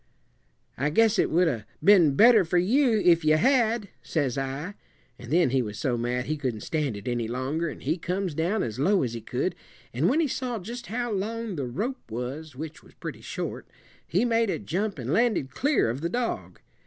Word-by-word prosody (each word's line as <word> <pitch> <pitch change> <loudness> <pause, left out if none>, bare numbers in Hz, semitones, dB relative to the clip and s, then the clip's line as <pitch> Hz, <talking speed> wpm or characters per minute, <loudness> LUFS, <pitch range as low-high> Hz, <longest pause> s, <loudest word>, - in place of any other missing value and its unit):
'I 140 +3 +1
guess 220 +6 +3
it - - +3
would 175 +2 +3
'a' 120 -9 -1 0.2
been 175 -8 +6
better 225 - +7
fur 175 +1 0
you 230 +5 +3
if 170 -2 +5
you 155 0 +4
had,' 230 - +2
says 140 -6 -1
I; 135 +7 -3 0.5
an' 120 - -10
then 165 -3 +3
he 135 -1 +2
was 105 -3 -5
so 130 -5 0
mad 120 +1 -1
he 155 +4 -2
couldn't 125 -7 -3
stand 145 -7 -2
it 100 - -10
any 120 -2 -1
longer, 135 +8 -2
and - - -9
he 170 - -1
comes 180 0 -2
down 175 +8 0
as 115 +1 -4
low 190 +5 +3
as 120 -3 -2
he 115 - -5
could, - - -2 0.4
and 135 +8 +2
when 285 +6 +2
he 325 - +2
saw 250 -2 -3
just 235 +5 -7
how 240 +2 -2
long 220 +1 -3
the 140 -5 -3
rope 215 - -4
was 130 +6 -5
which 155 +3 -7
was - - -20
pretty - - -7
short - - -5 0.4
he 190 +8 +1
made 230 -2 +2
a - - 0
jump 195 +3 -2
and 130 +2 -3
landed 215 - +1
clear 280 - +2
of 120 +5 -3
the 170 - -1
dog. 240 +4 -3
165 Hz, 210 wpm, -26 LUFS, 130-220 Hz, 0.5 s, better